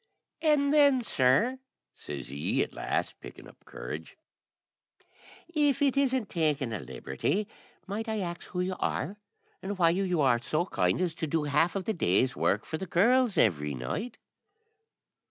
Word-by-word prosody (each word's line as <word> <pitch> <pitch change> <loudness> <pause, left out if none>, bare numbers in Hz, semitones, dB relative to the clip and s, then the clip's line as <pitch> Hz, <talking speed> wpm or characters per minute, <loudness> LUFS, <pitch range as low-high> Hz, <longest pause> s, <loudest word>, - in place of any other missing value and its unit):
"An 295 -3 +3
then, 285 -4 +5
sir," 220 - +2 0.3
says - - -7
he, - - 0
at - - -8
last, - - -2
picking - - -11
up - - -18
courage, - - -8 1.3
"if 295 -5 +1
it 280 -2 +2
isn't 260 -5 +1
taking 150 -7 0
a 105 - -3
liberty, 65 - -2 0.4
might 215 +3 -4
I 220 -1 -1
ax 175 -2 -5
who 180 - -3
you 185 +1 -2
are, 200 - -2 0.4
and 195 +1 -4
why 170 -2 +4
you 180 -1 0
are 120 -4 +3
so 155 +7 0
kind 90 - 0
as 175 -3 0
to 160 - -4
do 155 +1 0
half 150 +5 +2
of 190 -2 -2
the 220 - 0
day's 130 - +1
work 105 - +1
for 160 - -4
the 190 - -5
girls 235 +6 +3
every 75 -8 +2
night?" 210 - -4
180 Hz, 160 wpm, -29 LUFS, -, 1.3 s, then